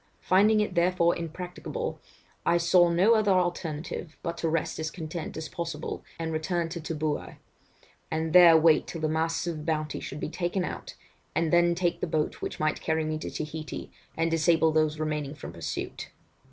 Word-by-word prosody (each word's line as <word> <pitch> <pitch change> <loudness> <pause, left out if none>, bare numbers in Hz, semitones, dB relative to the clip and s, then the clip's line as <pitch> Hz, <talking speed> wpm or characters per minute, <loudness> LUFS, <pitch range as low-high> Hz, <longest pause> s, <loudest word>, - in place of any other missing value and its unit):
Finding 210 +3 +4
it 210 - -1
therefore 175 -1 +3
impracticable, 180 - -5 0.4
I 170 - +3
saw 175 +1 +5
no 185 +7 +4
other 215 -3 +3
alternative 170 -3 -2
but 170 - -2
to 165 - 0
rest 160 0 -1
as 160 0 -2
content 160 0 -6
as 160 0 -4
possible 170 -1 -5
and 165 -1 -3
return 165 +1 -1
to 170 0 -5
Tooboui, 155 -1 -3 0.7
and 160 0 -2
there 175 -2 +9
wait 160 0 +4
till 165 - -6
the 155 - +1
masts 160 +2 0
of 170 -2 -2
the 150 - -7
Bounty 155 -1 -1
should 140 - -6
be - - -3
taken 175 +2 -1
out, - - -6 0.4
and 165 0 +1
then 175 0 +5
take 175 -1 0
the - - 0
boat 155 -1 -1
which - - -4
might 155 0 0
carry 160 -1 0
me 155 0 -2
to - - -5
Taheité, 155 0 -6 0.3
and 165 0 +1
disable 165 0 +3
those 155 0 +2
remaining 150 -2 -2
from - - -9
pursuit. - - -5
165 Hz, 180 wpm, -28 LUFS, 155-175 Hz, 0.7 s, there